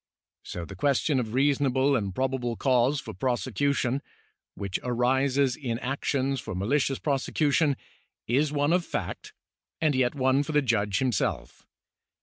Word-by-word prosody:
So 85 -1 -6
the 100 - -10
question 140 - +1
of 115 -1 -3
reasonable 135 0 +2
and 100 -6 -2
probable 130 -2 -1
cause 130 +2 +2
for - - -8
prosecution 130 +4 0 0.3
— - - -50
which 100 -2 -3
arises 130 +2 +1
in 120 -6 -3
actions 135 +1 -1
for 95 - -6
malicious 130 +8 +1
prose 140 -3 -1
cution— 150 -1 +2 0.5
is 140 +5 +1
one 145 +2 +1
of 180 0 +2
fact - - -5 0.5
and 155 -2 +2
yet 130 0 +1
one 130 0 +3
for 155 +2 -4
the 150 -1 +3
judge 105 -5 +1
himself. 125 -5 -2
130 Hz, 145 wpm, -27 LUFS, 120-140 Hz, 0.5 s, one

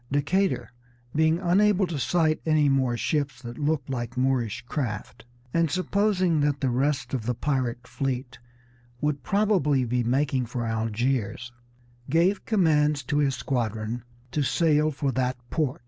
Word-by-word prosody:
Decatur, 180 +7 +1 0.4
being 160 +1 +3
unable 195 +2 +3
to 165 -5 -4
sight 155 +3 +1
any 155 -2 +3
more 130 -3 +1
ships 145 +2 -1
that 120 +2 -7
looked 150 -2 0
like 125 -2 -4
Moorish 125 -4 0
craft, 120 -4 -4 0.3
and 165 -1 +2
supposing 185 -1 +1
that 145 -1 +1
the 130 -2 0
rest 130 0 0
of 120 -4 -2
the 125 - 0
pirate 125 -3 -1
fleet 130 -1 -3 0.6
would 150 0 -1
probably 185 -11 +2
be 120 +1 0
making 130 0 +1
for 120 0 -3
Algiers, 115 +1 -1 0.6
gave 175 +7 +2
commands 150 -8 +2
to 145 +3 -1
his 140 -2 +2
squadron 115 -2 -2 0.3
to 150 - 0
sail 155 +1 +2
for 140 -2 -1
that 130 0 -1
port. 150 -4 -1
140 Hz, 145 wpm, -26 LUFS, 125-160 Hz, 0.6 s, being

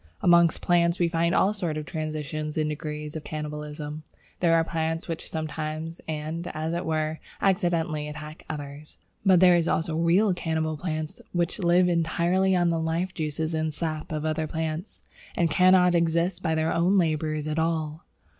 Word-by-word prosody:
Among 170 -1 +6
plants 170 +1 +1
we 175 -2 +2
find 170 +1 +1
all 200 +2 +3
sorts 175 -7 -3
of 155 - -4
transitions 155 -1 -4
and 155 -1 +1
degrees 150 0 -5
of 155 - -5
cannibalism. 150 0 -5 0.4
There 165 -2 +4
are 165 - +4
plants 160 0 -2
which 165 -2 -5
sometimes, 155 +1 -4
and, 160 +2 -4
as 160 +1 -2
it 170 0 -3
were, 155 0 -1 0.2
accidentally, 170 -5 +1
attack 150 +1 -8
others. 145 0 -7 0.3
But 185 -3 +5
there 180 -1 +7
are 170 -1 +2
also 160 0 0
real 175 +5 +3
cannibal 160 -2 -1
plants 155 -1 -4
which 175 -1 -1
live 180 0 +4
entirely 175 +3 +2
on 175 -1 +3
the 165 - 0
life 165 +3 -1
juices 155 0 -2
and 160 0 0
sap 155 -2 -3
of 155 0 -2
other 155 0 -1
plants, 160 +3 -4 0.4
and 170 -2 +2
cannot 180 -1 +5
exist 170 +2 +1
by 160 -3 0
their 160 0 +1
own 180 +4 +3
labours 155 -3 0
at 155 +1 -1
all. 160 -1 -1
160 Hz, 170 wpm, -26 LUFS, 155-170 Hz, 0.4 s, there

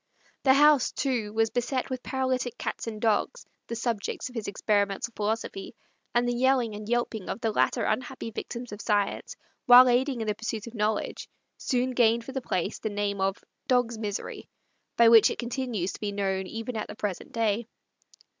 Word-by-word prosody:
The 265 -1 +5
house, 295 -2 +5
too, 240 -6 -1
was 225 0 +1
beset 250 +3 -2
with 255 -1 -3
paralytic 260 -2 -2
cats - - -4
and 215 -2 -5
dogs, 225 - 0 0.2
the 230 - -4
subjects 230 0 -3
of - - -14
his 225 -3 -4
experimental 205 +2 0
philosophy; 210 -2 -3 0.4
and 240 0 +3
the 245 - +1
yelling 250 -2 +2
and 210 +1 -7
yelping 235 -4 -1
of - - -3
the 225 -2 0
latter - - +1
unhappy 255 -3 -2
victims 240 +2 -6
of 205 +1 -7
science, 205 -2 -1 0.3
while 250 +1 +10
aiding 250 +1 +2
in 220 - -2
the 210 - 0
pursuit 220 0 -4
of 235 - -9
knowledge, 215 -1 -2 0.3
soon 255 -1 0
gained 235 -2 +3
for 265 - -7
the 265 0 -3
place 185 -3 -2
the 220 - -3
name 205 -1 -2
of 195 0 -1 0.2
"Dog's 245 -3 +1
Misery," 205 -2 -5 0.5
by 235 - +7
which 230 -1 +8
it - - -4
continues 240 -6 -3
to - - -9
be 210 -1 -2
known 190 -1 -1
even 225 +4 -5
at 215 - -3
the - - -8
present 205 -4 -4
day. 225 0 0
230 Hz, 185 wpm, -27 LUFS, 210-245 Hz, 0.5 s, while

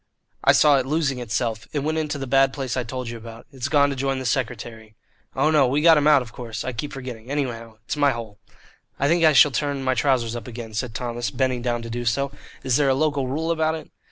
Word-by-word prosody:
"I - - +6
saw 145 -2 +5
it 130 - -3
losing 145 -3 0
itself. 115 -1 -2
It 145 - -1
went 155 +1 0
into 150 -1 -2
the 135 - -4
bad 135 +1 +3
place 135 -3 -3
I 130 - 0
told 125 +1 -5
you 120 - -6
about. 115 0 -11
It's 130 -1 -4
gone 145 -1 +3
to - - -3
join 135 0 -1
the 130 - -5
secretary. 115 -4 -3 0.4
Oh, 150 +4 +2
no, 145 -4 +4
we 135 +4 +1
got 165 +1 +7
him 150 -1 +2
out, 150 -4 +6
of 115 -1 -14
course; 115 -3 -6
I 130 - -3
keep 145 +6 -5
forgetting. 125 -3 -8
Anyhow, 115 -6 -3
it's - - -3
my 145 -1 +3
hole." 115 -5 -6 0.6
"I 140 - +2
think 170 +2 +2
I 155 -1 +6
shall 140 +2 +7
turn 140 +2 -2
my 130 0 +2
trousers 125 -4 +1
up 120 -3 -7
again," 115 -2 -8
said 115 +1 -3
Thomas, 120 -2 -3
bending 130 +2 -1
down 120 -1 -2
to 115 - -7
do 120 +1 -3
so. 135 +4 0 0.3
"Is 130 -2 +2
there 145 -2 +3
a 130 - +3
local 145 -2 0
rule 160 +5 -1
about 160 -1 +1
it?" 155 -2 -10
130 Hz, 250 wpm, -23 LUFS, 120-145 Hz, 0.6 s, got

